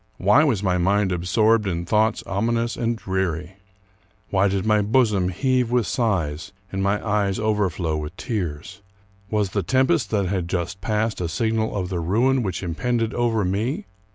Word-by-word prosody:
Why 105 +9 +5
Avas 125 -10 +1
my 90 -2 +1
mind 100 +2 +2
absorbed 105 +5 +2
in 85 -2 -2
thoughts 110 +4 +1
ominous 115 +4 -1
and 115 0 -1
dreary? 95 -2 -3 0.7
Why 100 0 +3
did 95 0 -1
my 105 -1 +3
bosom 105 -4 +2
heave 125 +5 +1
with 120 -2 +2
sighs 90 - -1 0.2
and 95 - -2
my 100 +3 0
eyes 100 -2 +1
over 105 -3 +1
flow 80 -2 -2
with 75 +3 -6
tears? 90 - -4 0.5
Was 105 -3 0
the 100 - 0
tempest 130 - +2
that 100 -3 +1
had 90 -2 -2
just 90 +1 -3
passed 105 0 -1
a 85 - -2
signal 110 +5 -1
of 90 -2 -2
the 90 -2 -2
ruin 120 +10 +2
which 95 -4 -3
impended 115 +7 -1
over 115 -4 +1
me? 105 +9 -1
100 Hz, 170 wpm, -23 LUFS, 90-115 Hz, 0.7 s, Why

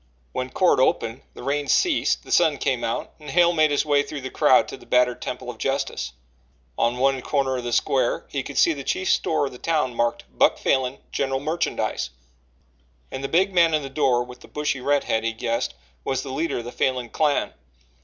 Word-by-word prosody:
When 130 - -3
court 180 +2 +3
opened, 120 -2 +1
the - - -9
rain 145 +1 -1
ceased, 355 -4 +2
the - - -11
sun - - +4
came - - -1
out - - -2
and 150 - -10
Hale 175 0 +4
made 155 -2 +4
his 145 +1 +1
way 145 -1 +3
through 145 0 -6
the 130 - -6
crowd - - +4
to - - -7
the - - -17
battered 125 -1 +2
temple - - -5
of - - -15
justice. 65 -1 -2 0.6
On 120 - +1
one 135 0 +2
corner 135 -1 0
of 125 - -4
the 120 - -3
square 125 +1 +1
he 140 - -3
could 140 +1 -8
see 165 - +5
the 140 -2 -7
chief 185 +7 0
store 155 -3 +1
of 135 - -5
the 125 - -11
town 150 -6 0
marked 120 0 0
"Buck - - +4
Falin 130 0 0
General 135 -1 -1
Merchandise," 155 - -2 1.0
and 135 0 -5
the - - -1
big 185 +6 +2
man 170 -3 +4
in 155 - -1
the 135 - -6
door 130 -4 +2
with 125 0 -12
the - - -15
bushy 145 -3 -2
redhead, 140 -5 +1
he 115 0 -1
guessed, 115 - -2 0.3
was 135 -1 -1
the 135 - -6
leader 165 +4 -1
of 120 - -5
the 120 - -6
Falin 125 -2 -1
clan. 150 -2 +1
135 Hz, 215 wpm, -24 LUFS, 125-150 Hz, 1.0 s, see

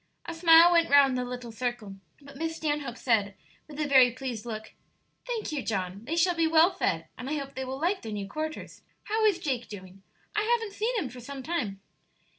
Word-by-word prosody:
A 335 - -5
smile 330 +1 +7
went 335 -1 +3
round 280 -2 +6
the 250 - -1
little 245 -1 -6
circle, 225 -3 -4 0.2
but 280 -1 -14
Miss 325 +3 -3
Stanhope 295 -6 -3
said, 205 -5 +1 0.3
with 300 -1 -10
a 300 - 0
very 260 -3 +6
pleased 245 -2 -6
look, 220 -1 -6 0.5
"Thank 460 -7 -3
you, 295 -3 -2
John; 195 -2 -3
they 315 +6 -2
shall 350 +2 +3
be 330 -1 +1
well 325 +3 +5
fed, - - -1
and 250 +2 -5
I - - -1
hope 275 -1 -6
they 265 - -4
will 265 +1 -5
like 365 +5 0
their 225 - -7
new 205 -2 -4
quarters. 310 +8 -6 0.2
How 440 +1 -1
is 410 -5 +4
Jake 265 -9 -3
doing? 190 -1 -11 0.3
I 425 - +2
haven't 450 -2 0
seen 455 +4 -1
him 335 - -2
for 250 +1 -11
some 270 +2 -8
time." 235 - -3
275 Hz, 215 wpm, -28 LUFS, 235-330 Hz, 0.5 s, smile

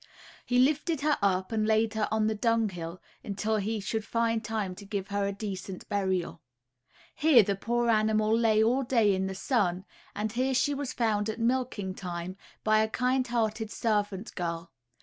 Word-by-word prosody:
He 245 - +2
lifted 300 +4 +2
her 300 0 +2
up 190 -1 +1
and 215 -1 0
laid 220 0 +2
her 220 -1 0
on 220 0 +1
the 220 - +1
dunghill, 205 -7 -1 0.2
until 210 +2 -1
he 215 +2 -1
should 215 +2 -2
find 230 0 0
time 215 -4 -2
to 205 - -9
give 200 -1 -4
her 200 0 0
a - - -1
decent 195 -2 -6
burial. 190 -5 -1 0.7
Here 290 -7 +6
the 200 +1 -1
poor 235 +4 -1
animal 215 -1 +3
lay 220 -2 +3
all 245 +4 +2
day 230 -5 +3
in 190 0 -1
the 190 - -5
sun, 190 -4 0 0.3
and 210 +1 -2
here 255 +3 0
she 285 +3 +2
was 280 -2 -3
found 220 -3 0
at 220 - -4
milking 230 -5 -1
time, 180 -1 -5 0.3
by 215 0 +4
a 220 0 +2
kind 255 +2 +1
hearted 220 -2 -1
servant 210 -2 -1
girl. 170 -2 -4
215 Hz, 180 wpm, -29 LUFS, 195-235 Hz, 0.7 s, Here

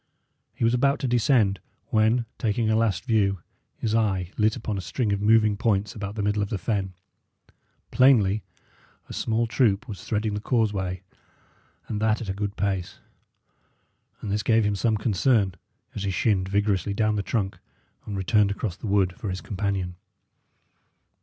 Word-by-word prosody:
He - - -4
was 115 +1 +3
about 140 +3 +2
to 135 - 0
descend, 115 -5 +2 0.3
when, 110 +2 +2
taking 110 0 +1
a - - +3
last 110 -4 +1
view, 105 -5 +2 0.4
his 110 -2 -2
eye 95 -5 +1
lit 110 0 +2
upon 110 -1 -4
a 95 - -3
string 105 +3 -1
of 100 - -2
moving 110 0 +4
points 105 -1 0
about 100 -1 -6
the 105 - -2
middle 105 +1 +1
of 100 - -2
the 105 - -2
fen. 95 -1 -2 1.0
Plainly 110 -6 +4 0.7
a - - -9
small 115 +1 0
troop 110 -4 +1
was 100 -4 -8
threading 105 0 -1
the 105 - -2
causeway, 100 -6 -1 0.8
and 105 -1 -3
that 110 0 +2
at 110 - -6
a - - 0
good 100 +1 -4
pace; 95 -3 -2 1.2
and 100 - -4
this 105 +1 0
gave 115 +1 +3
him 105 0 +1
some 110 +2 +1
concern 105 -1 +2 0.4
as - - -5
he 100 - -1
shinned 95 0 +1
vigorously 100 0 0
down 110 0 +1
the 105 - 0
trunk 100 -2 -2 0.5
and 100 -2 -4
returned 100 +1 +3
across 100 -2 -3
the 105 - -7
wood 95 -2 +2
for 110 -5 -4
his 90 0 -3
companion. 95 -3 -3
105 Hz, 170 wpm, -25 LUFS, 100-110 Hz, 1.2 s, moving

